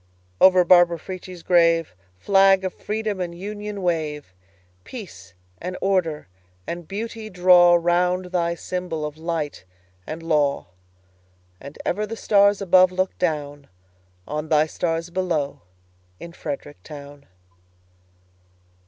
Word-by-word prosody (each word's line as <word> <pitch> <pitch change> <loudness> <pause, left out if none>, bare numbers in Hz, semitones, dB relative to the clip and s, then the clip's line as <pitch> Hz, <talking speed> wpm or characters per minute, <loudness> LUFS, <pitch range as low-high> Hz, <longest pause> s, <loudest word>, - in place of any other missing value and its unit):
Over 185 -1 +6
Barbara 175 -1 +5
Frietchie's 185 0 -9
grave, 165 -2 +3 0.2
Flag 195 - +4
of 185 - -3
Freedom 210 -2 -3
and 170 -1 -5
Union, 205 +1 -6
wave! 150 - -2 0.5
Peace 95 - -10 0.3
and 180 +1 -5
order 180 - 0 0.4
and 170 -1 -6
beauty 220 +2 -6
drawRound 180 0 +4
thy 170 -2 0
symbol 175 -3 -4
of 150 -1 -6
light 160 - -4 0.4
and 160 +1 -6
law; 150 -4 +1 0.9
And 140 - -11
ever 210 +4 -1
the 225 +2 -6
stars 200 -1 +3
above 185 0 +5
look 185 +1 -1
downOn 145 -4 -3 0.8
thy 155 0 +4
stars 165 +1 -3
below 170 -6 -2 0.6
in 170 - -10
Frederick 145 -2 -7
town! 145 -1 -12
175 Hz, 110 wpm, -23 LUFS, 155-185 Hz, 0.9 s, Over